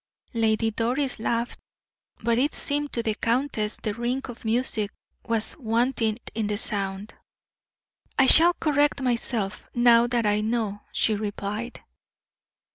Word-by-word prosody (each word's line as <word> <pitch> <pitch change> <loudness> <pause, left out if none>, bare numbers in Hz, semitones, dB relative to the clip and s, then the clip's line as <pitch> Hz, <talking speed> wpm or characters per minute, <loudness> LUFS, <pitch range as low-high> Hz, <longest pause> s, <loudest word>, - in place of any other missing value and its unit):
Lady 225 -1 +1
Doris 250 +5 -1
laughed, 230 +2 -2 0.6
but 235 +1 +2
it 285 +4 0
seemed 290 0 -2
to 235 - -2
the 220 - 0
countess 230 -2 -1
the 210 - -3
ring 240 +4 -2
of 245 -2 -10
music 225 -2 +1 0.4
was 225 -2 0
wanting 230 -2 0 0.2
in 220 -2 -2
the 210 0 -1
sound. 200 0 -1 1.0
"I 270 - +5
shall 335 +6 +8
correct 295 -3 +1
myself, 235 -5 -2
now 240 -1 +5
that 240 -2 0
I 210 0 +2
know," 215 -2 -2
she 220 - +1
replied. 210 +2 -4
230 Hz, 130 wpm, -25 LUFS, 215-245 Hz, 1.0 s, shall